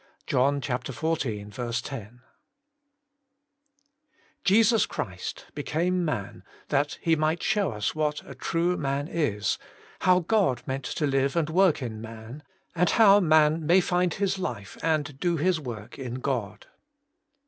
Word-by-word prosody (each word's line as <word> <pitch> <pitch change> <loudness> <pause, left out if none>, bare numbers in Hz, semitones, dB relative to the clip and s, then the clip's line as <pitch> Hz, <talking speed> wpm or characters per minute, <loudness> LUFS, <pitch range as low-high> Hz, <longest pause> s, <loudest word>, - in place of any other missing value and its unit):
— - - -37
John 140 +3 +2
xiv. 120 -4 -2
10. 125 -2 -8 2.2
T 200 +3 +5
ESUS 225 0 +4
CHRIST 90 -2 -5
became 180 +3 0
man 105 - -3 0.3
that 145 +4 0
He 165 -2 +3
^ - - -5
might 155 +2 0
show 210 -3 +1
us 105 -1 -2
what 150 -1 -1
a - - -8
true 175 +2 0
man 140 +1 -1
is, 110 -12 -1 0.4
how 185 0 +4
God 175 - +1
meant 130 0 -4
to 150 +4 -1
Hve 135 0 +1
and 160 -2 0
work 180 -5 +3
in 110 -3 -5
man, 115 +5 -9 0.3
and 175 0 +2
how 205 -3 +6
man 155 -2 +4
may 170 +5 +5
find 180 -2 +1
his 195 -1 0
life 105 - -5
and 150 -4 -1
do 175 +1 +1
his 175 +2 +1
work 120 -4 -8
in 125 -2 -5
God. 125 -6 -3
150 Hz, 145 wpm, -27 LUFS, 125-175 Hz, 2.2 s, how